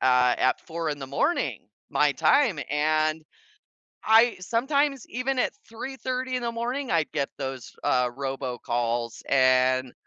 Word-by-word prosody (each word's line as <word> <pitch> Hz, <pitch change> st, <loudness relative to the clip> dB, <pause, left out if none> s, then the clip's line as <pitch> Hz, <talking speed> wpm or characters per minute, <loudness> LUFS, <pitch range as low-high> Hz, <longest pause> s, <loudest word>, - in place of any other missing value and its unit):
at 125 Hz, -1 st, +3 dB
at 130 Hz, -, +2 dB
4 165 Hz, -1 st, -4 dB
in 145 Hz, -, -4 dB
the 135 Hz, -, -6 dB
morning 140 Hz, -, -1 dB, 0.2 s
my -, -, +3 dB
time, 235 Hz, -, +3 dB
and 155 Hz, +1 st, +1 dB, 0.8 s
I 225 Hz, +2 st, +5 dB
sometimes 270 Hz, +6 st, 0 dB
even 255 Hz, +3 st, -1 dB
at -, -, +1 dB
3:30 255 Hz, +2 st, -4 dB
AM -, -, +2 dB
in 245 Hz, -, -5 dB
the 235 Hz, -, -1 dB
morning, 245 Hz, +3 st, -3 dB
I'd 165 Hz, -2 st, +1 dB
get 140 Hz, -3 st, -1 dB
those, 135 Hz, -2 st, -6 dB
uh, 125 Hz, -1 st, +2 dB
robocalls 120 Hz, -3 st, -3 dB
and, 130 Hz, -1 st, +3 dB
155 Hz, 145 wpm, -26 LUFS, -, 0.8 s, I